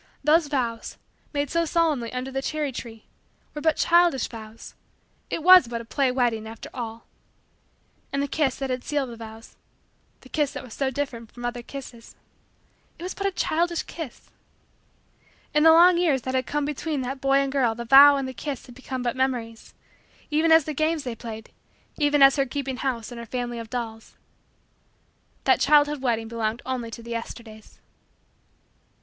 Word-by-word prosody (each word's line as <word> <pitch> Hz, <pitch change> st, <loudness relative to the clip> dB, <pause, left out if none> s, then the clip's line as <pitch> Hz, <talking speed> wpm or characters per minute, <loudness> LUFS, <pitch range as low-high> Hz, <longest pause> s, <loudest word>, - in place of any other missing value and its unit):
Those 310 Hz, +2 st, +4 dB
vows, 240 Hz, -5 st, -3 dB, 0.3 s
made 285 Hz, -2 st, -2 dB
so 335 Hz, 0 st, +2 dB
solemnly 310 Hz, -8 st, 0 dB
under 255 Hz, +1 st, -4 dB
the 270 Hz, 0 st, -2 dB
cherry 300 Hz, 0 st, -2 dB
tree, 225 Hz, -3 st, -9 dB, 0.5 s
were 295 Hz, -, -6 dB
but 320 Hz, -1 st, +2 dB
childish 340 Hz, -6 st, +3 dB
vows. 220 Hz, -1 st, -10 dB, 0.6 s
It 325 Hz, -, -3 dB
was 365 Hz, -6 st, +8 dB
but 235 Hz, 0 st, -4 dB
a 230 Hz, -, -9 dB
play 265 Hz, +2 st, +1 dB
wedding, 240 Hz, -4 st, 0 dB
after 225 Hz, 0 st, -10 dB
all. 230 Hz, -2 st, -6 dB, 1.1 s
And 280 Hz, -, -1 dB
the -, -, -1 dB
kiss 275 Hz, -2 st, 0 dB
that 270 Hz, -1 st, -4 dB
had 250 Hz, 0 st, -3 dB
sealed 285 Hz, -4 st, -2 dB
the -, -, -8 dB
vows 225 Hz, 0 st, -11 dB, 0.6 s
the 260 Hz, -, -16 dB
kiss 295 Hz, -1 st, 0 dB
that -, -, -6 dB
was 245 Hz, -4 st, -11 dB
so 270 Hz, -1 st, -1 dB
different 255 Hz, -5 st, -5 dB
from 240 Hz, -1 st, -8 dB
other 240 Hz, 0 st, -3 dB
kisses 240 Hz, -2 st, -10 dB, 0.8 s
it -, -, -10 dB
was 370 Hz, -, -4 dB
but 395 Hz, -, -2 dB
a -, -, 0 dB
childish 340 Hz, -1 st, 0 dB
kiss... 320 Hz, -7 st, -9 dB, 1.2 s
In 300 Hz, -, +3 dB
the 320 Hz, +1 st, +8 dB
long 345 Hz, +2 st, +7 dB
years 290 Hz, -8 st, +2 dB
that 260 Hz, -, -3 dB
had 260 Hz, -1 st, 0 dB
come 295 Hz, -1 st, -1 dB
between 295 Hz, 0 st, -3 dB
that 265 Hz, +1 st, -5 dB
boy 275 Hz, 0 st, +2 dB
and 275 Hz, -1 st, +1 dB
girl 250 Hz, -5 st, +1 dB
the 235 Hz, +1 st, -6 dB
vows 280 Hz, +4 st, +8 dB
and 270 Hz, -1 st, -2 dB
the 260 Hz, -, -6 dB
kiss 275 Hz, 0 st, -5 dB
had 245 Hz, -, -13 dB
become 260 Hz, 0 st, -6 dB
but 245 Hz, +1 st, -1 dB
memories 245 Hz, -4 st, -3 dB, 0.6 s
even 315 Hz, +2 st, +3 dB
as 320 Hz, -1 st, +7 dB
the 310 Hz, -, -3 dB
games 310 Hz, +1 st, 0 dB
they 250 Hz, -3 st, -4 dB
played 220 Hz, -1 st, -9 dB, 0.5 s
even 290 Hz, -2 st, +4 dB
as 275 Hz, +1 st, +7 dB
her 275 Hz, -, +2 dB
keeping 270 Hz, 0 st, -4 dB
house 250 Hz, -4 st, -3 dB
and 240 Hz, -, -8 dB
her 235 Hz, -, -7 dB
family 240 Hz, 0 st, -4 dB
of 225 Hz, -1 st, -8 dB
dolls. 225 Hz, -2 st, -6 dB, 1.3 s
That -, -, +4 dB
child 295 Hz, -1 st, +4 dB
wedding 230 Hz, -3 st, 0 dB
belonged 225 Hz, 0 st, -3 dB
only 255 Hz, -3 st, -3 dB
to 230 Hz, +1 st, -9 dB
the 235 Hz, -, -9 dB
Yesterdays. 230 Hz, -2 st, -8 dB
260 Hz, 185 wpm, -25 LUFS, 235-295 Hz, 1.3 s, was